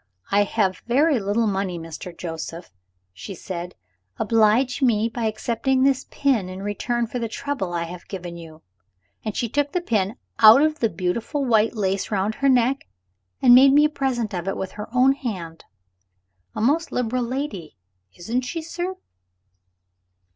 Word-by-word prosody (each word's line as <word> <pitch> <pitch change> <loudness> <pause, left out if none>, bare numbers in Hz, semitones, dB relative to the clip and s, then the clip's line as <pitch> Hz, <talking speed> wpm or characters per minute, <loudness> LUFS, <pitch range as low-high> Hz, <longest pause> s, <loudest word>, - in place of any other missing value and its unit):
'I 205 +1 +4
have 195 -3 0
very 280 +3 +3
little 205 +3 0
money, 195 -3 -1
Mr. 165 +2 -8
Joseph,' 165 - -6 0.4
she 190 - -8
said; 180 0 -6 0.4
'oblige 230 +4 +2
me 225 -4 +3
by 230 0 -4
accepting 235 +4 0
this 270 -1 +2
pin 245 -10 0
in 185 +1 -7
return 235 +4 -1
for 245 +2 -5
the 230 - -2
trouble 245 -5 -4
I 170 -1 -1
have 175 +1 -9
given 175 -3 -7
you.' 165 -2 -12 0.6
And 215 -2 -4
she 235 - 0
took 285 +4 -1
the 360 - +1
pin 215 - -1 0.2
out 225 +6 +9
of 310 0 +1
the 225 - +2
beautiful 220 +10 -2
white 225 -1 +2
lace 195 -2 -1
round 205 +1 0
her 275 +2 +1
neck, 255 +1 +2 0.6
and 245 -2 +8
made 270 +2 +8
me 295 +1 +6
a - - +2
present 255 -7 -2
of 175 0 -4
it 195 - -2
with 190 - -4
her 210 0 -8
own 255 +2 +4
hand. 190 -12 -5 0.9
A - - -3
most 300 +8 +1
liberal 250 +1 -1
lady, 235 - -4 0.4
isn't 230 +8 -2
she, 320 +6 -5
sir?" 350 +3 -4
225 Hz, 165 wpm, -23 LUFS, 190-260 Hz, 0.9 s, out